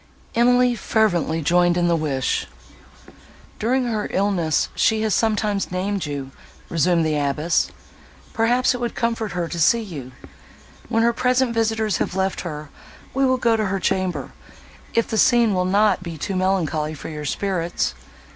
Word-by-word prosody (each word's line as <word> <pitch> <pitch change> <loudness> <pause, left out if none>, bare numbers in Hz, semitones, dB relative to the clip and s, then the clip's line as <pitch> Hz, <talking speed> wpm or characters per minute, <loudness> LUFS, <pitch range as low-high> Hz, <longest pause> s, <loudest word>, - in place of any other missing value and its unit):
Emily 245 +1 +4
fervently 175 -8 0
joined 175 +2 +3
in 175 0 +2
the 170 - +3
wish. 140 -5 -1 1.1
"During 250 +4 +1
her 220 -3 -2
illness, 185 -5 +1
she 220 -1 +2
has 215 -2 +1
sometimes 210 -3 0
named 190 -1 -2
you," 140 -2 -5 0.4
resumed 170 0 +2
the 155 -1 0
abbess; 150 +3 +1 0.6
"perhaps, 245 +3 +2
it 250 - -5
would 240 - -3
comfort 230 -3 -1
her 175 -1 -2
to 170 - -5
see 230 +8 +4
you; 145 - -8 0.8
when 225 -1 +2
her 235 0 +3
present 250 0 +1
visitors 220 -3 0
have - - -2
left 190 0 -1
her, 150 -4 -6 0.4
we 270 0 +2
will 260 0 +2
go 230 -2 +2
to 215 -1 0
her 195 0 -1
chamber, 185 -1 -1 0.6
if 230 - +2
the 220 - -1
scene 235 -4 +4
will 180 -1 +1
not 200 +1 +3
be 170 -3 -7
too 190 +6 -3
melancholy 165 -5 0
for 145 - -8
your 150 -1 -6
spirits. 175 +2 -1
195 Hz, 160 wpm, -22 LUFS, 170-225 Hz, 1.1 s, Emily